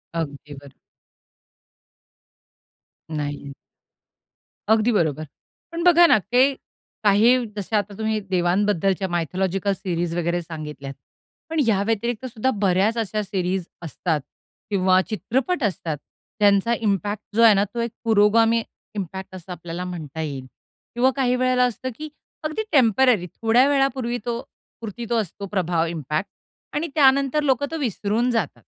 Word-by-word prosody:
अगदी 150 -2 -5
बरं. 140 0 -12 2.5
नाही 145 -1 -2
आहे. 140 - -8 1.2
अगदी 220 +2 +3
बरोबर. 155 - 0 0.5
पण 335 0 -3
बघा 345 -1 +7
ना, - - +6
काही 250 +7 +3 0.5
काही, 225 +5 +4
जसे 205 +2 -3
आता 205 -1 0
तुम्ही 220 0 -1
देवांबद्दलच्या 190 +1 +1
मायथोलॉजिकल 185 +3 -1
सीरीज 175 -3 -3
वगैरे 175 0 0
सांगितल्यात. 150 -4 -7 0.6
पण 325 0 -1
या 200 -3 +3
व्यतिरिक्त 225 +3 -2
सुद्धा 245 0 -1
बऱ्याच 195 +4 +2
अश्या 215 -1 -1
सीरीज 185 -2 -2 0.2
असतात 160 -1 -2 0.5
किंवा 185 -2 +3
चित्रपट 260 - -1
असतात, 170 -6 -2 0.4
ज्यांचा 205 +2 +4
इम्पॅक्ट 205 0 -1
जो 230 - +4
आहे 225 -2 +8
ना, 200 0 +3
तो 210 +4 -6
एक 235 -1 -2
पुरोगामी 225 +1 +4 0.3
इम्पॅक्ट 190 -1 -6
असं 185 0 -10
आपल्याला 175 0 -6
म्हणता 160 -4 -6
येईल 140 -4 -5 0.5
किंवा 255 +2 +3
काही 255 -2 +2
वेळेला 255 0 +2
असतं, 250 +1 -1
की 310 +4 -7 0.3
अगदी 310 +8 -2
टेम्पररी 245 - +4
थोड्या 230 +4 +4
वेळापूर्वी 265 -3 +1
तो 235 0 -2 0.4
पुरती 230 +1 -6
तो 240 - +1
असतो 200 0 -7
प्रभाव, 175 -4 +1
इम्पॅक्ट 160 +2 -3 0.4
आणि 310 +3 -1
त्यानंतर 275 0 +4
लोकं 270 -1 +2
तो 325 - -2
विसरून 230 - 0
जातात. 230 -2 -2
205 Hz, 135 wpm, -23 LUFS, 175-240 Hz, 2.5 s, आहे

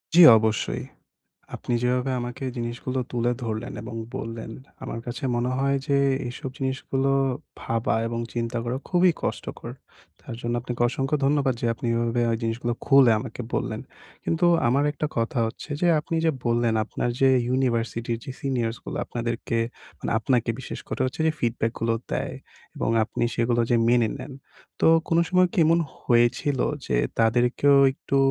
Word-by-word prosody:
জ্বি 175 - +10
অবশ্যই। 110 0 -1 0.7
আপনি - - -4
যেভাবে 125 +2 +1
আমাকে 120 +2 -5
জিনিসগুলো 120 +2 -3
তুলে 120 0 +1
ধরলেন 115 +3 -3
এবং - - -7 0.2
বললেন, 115 0 -6 0.3
আমার 115 - -5
কাছে 120 +5 -5
মনে 120 +1 0
হয় 140 +1 +2
যে 140 -2 +2 0.3
এসব 125 +2 -6
জিনিসগুলো 135 0 -1 0.5
ভাবা 115 0 -1
এবং 115 0 -3
চিন্তা 120 0 -2
করা 120 +2 -2
খুবই 180 0 +4
কষ্টকর। - - -4 0.5
তার - - -8
জন্য 120 0 -2
আপনাকে 120 0 -6
অসংখ্য 135 +3 -1
ধন্যবাদ 140 -2 +2
যে - - 0
আপনি 120 - -6
এভাবে 115 +1 0 0.2
জিনিসগুলো 120 +1 -1
খুলে 135 -3 +7
আমাকে 115 +1 -7
বললেন। - - -2 0.4
কিন্তু 165 +2 +1 0.2
আমার 135 +4 +2
একটা 150 - -2
কথা 115 +2 -1
হচ্ছে 115 - -8
যে, 175 - +3
আপনি 165 +2 -3
যে 160 - +4
বললেন 120 -1 +2
আপনার 120 - -2
যে 135 - +6 0.2
ইউনিভার্সিটির 120 -2 -1 0.2
সিনিয়রস 120 -5 -1
গুলো - - -5
আপনাদেরকে 115 -1 -3 0.4
মানে - - -4
আপনাকে 120 +1 +1
বিশেষ - - -7
করে - - -4
হচ্ছে 130 +4 -3
যে 160 - +3
ফিডব্যাক 115 -1 0
গুলো 115 0 +1 0.2
দেয়, - - -2 0.4
এবং - - 0
আপনি 120 - -2
সেগুলো 120 0 +1 0.3
মেনে 120 -2 +4
নেন। 140 - -8 0.5
তো - - +4 0.2
কোনো 165 0 +3
সময় 185 0 +4
কি - - -4
এমন 165 +1 +4 0.2
হয়েছিল 120 +3 +2 0.3
যে - - 0 0.2
তাদেরকেও 120 +5 +4 0.2
একটু 135 - -3
120 Hz, 155 wpm, -25 LUFS, 115-135 Hz, 0.7 s, জ্বি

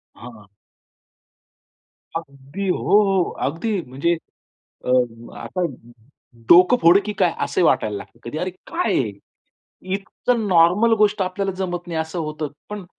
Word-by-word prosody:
हां. 115 -4 -12 1.7
अगदी. 140 +5 -7
हो, 180 - +1 0.3
हो. 195 -3 +1 0.2
अगदी. 185 +6 -2
म्हणजे 145 +6 -1 0.7
अ, - - -3 0.5
आता 185 - -5 0.9
डोकं 180 +8 +7
फोडू, 175 +4 +7
की 210 - -3
काय 175 -3 +3
असं 180 - 0
वाटायला 105 -7 +2
लागतं. 115 - -12
कधी 120 +6 -6
"अरे 185 0 -2 0.2
काय 355 +2 -1
आहे? - - 0 0.8
इतकं 215 +3 -2
नॉर्मल 180 +7 +5
गोष्ट 210 -1 +2
आपल्याला 195 +1 -1
जमत 175 -2 -3
नाही 165 -2 -3
असं 160 +2 -3
होतं." 155 -1 -3 0.2
पण 205 -3 -6
180 Hz, 130 wpm, -21 LUFS, 155-200 Hz, 1.7 s, डोकं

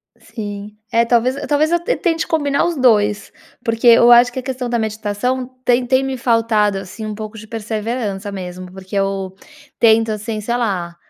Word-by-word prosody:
Sim. 210 -3 -8 0.2
É, 230 +1 +3
talvez 245 +2 +2
e - - -5
talvez 300 +2 +1
eu 345 - +3
te - - 0
tente 330 -3 -1
combinar 290 -3 +1
os 345 -1 -1
2. 210 -6 +2 0.3
Porque, 230 +1 0
eu 235 +1 +7
acho 240 +1 +7
que 260 - -5
a - - -4
questão 255 -1 -4
da 235 -1 0
meditação, 220 +4 -2 0.2
tem 245 0 +3
tem 260 +1 +2
me 265 -1 -3
faltado, 225 -4 +1
assim, 195 +4 -8
um 215 - -4
pouco 215 +1 -7
de 220 - -10
perseverança 215 -2 -4
mesmo, 180 -1 -7
porque 190 +1 -9
eu 195 -1 -2 0.4
tento, 225 0 +4
assim, 215 0 -4
sei 235 +3 -1
lá, 185 -8 -2
225 Hz, 190 wpm, -18 LUFS, 205-250 Hz, 0.4 s, eu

